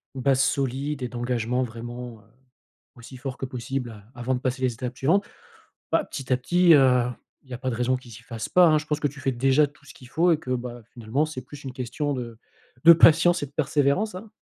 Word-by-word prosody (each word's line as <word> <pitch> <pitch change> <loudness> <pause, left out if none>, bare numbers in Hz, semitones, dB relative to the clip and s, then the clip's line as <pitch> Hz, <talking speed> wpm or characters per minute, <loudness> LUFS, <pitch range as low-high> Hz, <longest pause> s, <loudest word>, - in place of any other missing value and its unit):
base 135 0 +2
solide 135 +1 -1
et 125 - -1
d'engagement 120 0 -1
vraiment, 120 -1 -7
heu, - - -25 0.7
aussi 125 +2 -12
fort 135 +1 -6
que 130 - -4
possible 125 0 -4
a 110 +3 -15
avant 125 +2 -1
de 125 - -3
passer 130 0 -2
les 125 -2 +1
étapes 125 +2 -6
suivantes. 175 +11 +2 0.7
Bah, 320 - +3
petit 135 - -6
à - - +5
petit, 175 +6 +4
heu, 130 -3 +5 0.4
il 130 - -24
y - - -5
a 120 - -6
pas 130 - -4
de - - -3
raison 125 +2 +1
qu'ils 125 -2 -13
s'y 105 - -12
fassent 115 -2 -6
pas, 180 -1 +6
hein. 155 - +4
Je 150 - -7
pense 150 -1 -2
que 145 - +1
tu 140 +1 -11
fais 135 -2 0
déjà 135 +4 +3
tout 145 0 -20
ce 140 - -12
qu'il 125 - -15
faut 170 +5 +2
et 155 - +2
que, 130 - -8
bah, 120 -1 -5
finalement, 120 +6 -1
c'est 155 -5 -7
plus 145 -1 -12
une 130 - -6
question 140 +3 -3
de 120 -3 -6 0.5
de 170 - +11
patience 170 +1 +5
et - - -5
de 135 - -20
persévérance, 150 +7 +1
hein. 205 +3 -10
130 Hz, 240 wpm, -25 LUFS, 125-145 Hz, 0.7 s, de